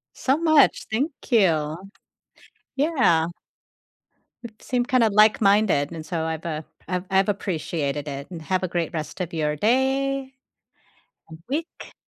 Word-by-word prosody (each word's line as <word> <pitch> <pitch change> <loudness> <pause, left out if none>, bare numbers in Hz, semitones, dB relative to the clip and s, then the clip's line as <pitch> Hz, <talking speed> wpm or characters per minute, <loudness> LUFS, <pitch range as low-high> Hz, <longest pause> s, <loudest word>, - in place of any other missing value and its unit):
So 270 +3 +1
much. 315 -3 +4
Thank 265 +9 0 0.2
you. 160 -8 +2 1.0
Yeah. 265 - +2 1.2
It 220 -2 -11
seemed 250 0 -1
kinda 250 -5 +3
like-minded 205 -6 +4
and 160 -2 -7
so 165 -2 -3
I've, 160 0 -4
uh, 155 -2 -3 0.3
I've 180 -1 -2
I've 195 +1 +3
appreciated 155 -7 -2
it 140 +4 -6
and 165 - -7
have 185 +3 -1
a - - 0
great 170 -1 -2
rest 155 +1 -5
of 175 -1 -4
your 150 -2 -1
day 265 - 0 1.0
and 160 - -11
week. 310 +5 -5
190 Hz, 135 wpm, -24 LUFS, 160-255 Hz, 1.2 s, much